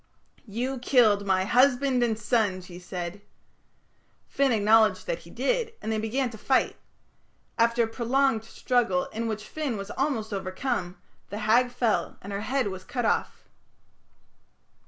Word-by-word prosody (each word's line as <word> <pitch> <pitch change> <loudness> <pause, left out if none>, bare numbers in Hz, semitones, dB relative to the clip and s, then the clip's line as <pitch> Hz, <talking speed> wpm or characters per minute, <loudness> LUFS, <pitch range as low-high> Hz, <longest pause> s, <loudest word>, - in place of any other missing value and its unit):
'You 245 +5 -3
killed 220 -6 +3
my 190 -1 +3
husband 255 +2 +3
and 230 -2 +1
son,' 215 -4 0
she 180 -1 -11
said." 180 +2 -6 1.1
Finn 275 -1 +1
acknowledged 220 0 +4
that - - -2
he - - -15
did, 485 -2 -1
and 220 - -4
they 220 - 0
began 240 +3 -1
to 220 - -11
fight. 260 +3 +1 0.8
After 235 +1 +3
a - - 0
prolonged 240 +1 +1
struggle, 250 +3 0
in 230 +1 -2
which 215 -1 -3
Finn 280 -1 -3
was 195 0 -6
almost 225 -7 -2
overcome, 185 -1 -3 0.3
the 205 - -5
Hag 245 +3 +4
fell 240 -3 -1
and 200 +1 -6
her 200 - -3
head 255 -1 0
was 190 -1 -7
cut 245 +2 -3
off. - - -1
225 Hz, 150 wpm, -27 LUFS, 205-255 Hz, 1.1 s, acknowledged